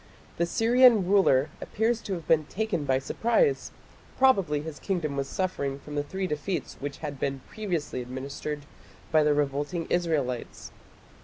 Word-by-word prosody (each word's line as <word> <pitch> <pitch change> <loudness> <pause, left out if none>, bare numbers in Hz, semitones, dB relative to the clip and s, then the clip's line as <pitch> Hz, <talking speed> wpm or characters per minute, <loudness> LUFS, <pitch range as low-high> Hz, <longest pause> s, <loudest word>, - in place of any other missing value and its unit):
The 170 - +1
Syrian 230 -1 +5
ruler 180 -9 +4
appears 225 +2 0
to 195 - -4
have 170 -4 -6
been 155 -2 +4
taken 190 -4 -2
by 135 -1 +2
surprise; 235 - +1 0.5
probably 195 - +3
his 160 -2 -7
kingdom 170 -7 -2
was 135 -1 -2
suffering 140 -8 -2
from 150 +1 -11
the 145 - 0
three 190 +7 -4
defeats 175 +3 -3
which 140 0 -5
had 145 -2 -5
been 135 -1 -2
previously 170 -11 -3
administered 140 +4 -5 0.5
by 155 -1 +5
the 150 -1 +3
revolting 145 +4 -1
Israelites. 150 -8 -1
155 Hz, 150 wpm, -27 LUFS, 140-195 Hz, 0.5 s, Syrian